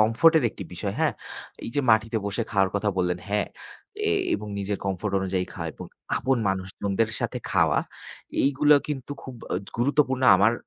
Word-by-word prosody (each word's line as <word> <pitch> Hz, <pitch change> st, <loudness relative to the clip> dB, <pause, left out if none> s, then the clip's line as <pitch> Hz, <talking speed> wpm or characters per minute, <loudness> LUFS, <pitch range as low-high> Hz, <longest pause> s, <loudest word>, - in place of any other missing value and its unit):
কমফোর্টের 130 Hz, +8 st, +5 dB
একটি 100 Hz, -, -8 dB
বিষয়, 95 Hz, +3 st, -3 dB
হ্যাঁ? -, -, +2 dB, 0.5 s
এইযে 130 Hz, +5 st, -1 dB
মাটিতে 110 Hz, +1 st, +3 dB
বসে 100 Hz, +3 st, -1 dB
খাওয়ার 95 Hz, -2 st, +3 dB
কথা 100 Hz, +1 st, +1 dB
বললেন। 90 Hz, -1 st, +1 dB
হ্যাঁ, 105 Hz, 0 st, +1 dB, 0.6 s
এ -, -, +2 dB, 0.2 s
এবং 105 Hz, -, -4 dB
নিজের 100 Hz, 0 st, -2 dB
কমফোর্ট 95 Hz, +2 st, -2 dB
অনুযায়ী 95 Hz, -1 st, -1 dB
খাওয়া -, -, -4 dB
এবং -, -, -8 dB, 0.3 s
আপন 135 Hz, 0 st, +1 dB
মানুষজনদের 95 Hz, +3 st, -1 dB
সাথে -, -, -2 dB
খাওয়া। -, -, +3 dB, 0.6 s
এইগুলা 145 Hz, +2 st, +5 dB
কিন্তু 145 Hz, -1 st, -4 dB
খুব 130 Hz, -, -8 dB, 0.2 s
অ -, -, +1 dB, 0.2 s
গুরুত্বপূর্ণ 130 Hz, 0 st, +2 dB
আমার 100 Hz, +4 st, +4 dB
110 Hz, 160 wpm, -26 LUFS, 95-130 Hz, 0.6 s, কমফোর্টের